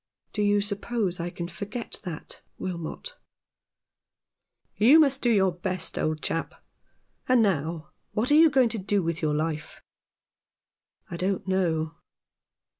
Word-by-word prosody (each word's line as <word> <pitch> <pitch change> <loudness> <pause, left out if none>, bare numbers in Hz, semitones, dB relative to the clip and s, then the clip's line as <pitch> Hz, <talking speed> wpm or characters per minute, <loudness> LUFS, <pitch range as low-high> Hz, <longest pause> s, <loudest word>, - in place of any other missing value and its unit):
Do 210 - -1
you 205 0 +3
suppose 205 -1 -1
that 170 - -3
I - - -3
can 170 0 -5
forget 205 +7 -6
that, 165 -4 -7 0.2
Wilmot? 180 - -5 0.8
" - - -52
"You 310 +4 +9
must 275 -3 +3
do 240 - +2
your 195 -4 +4
best, 180 0 -3
old 155 0 -1
chap. 165 - -2 0.7
And 250 -2 +5
now, 165 -4 -1 0.2
what 230 +6 0
are - - +7
you 320 +1 +8
going 260 -4 +4
to 225 - -3
do 200 0 0
with 165 -1 -2
your 150 -2 +1
life? 155 0 -3 0.4
" - - -66
" - - -45
I 170 - -4
don't 190 +2 -1
know." 165 -4 0
185 Hz, 155 wpm, -27 LUFS, 165-220 Hz, 0.8 s, You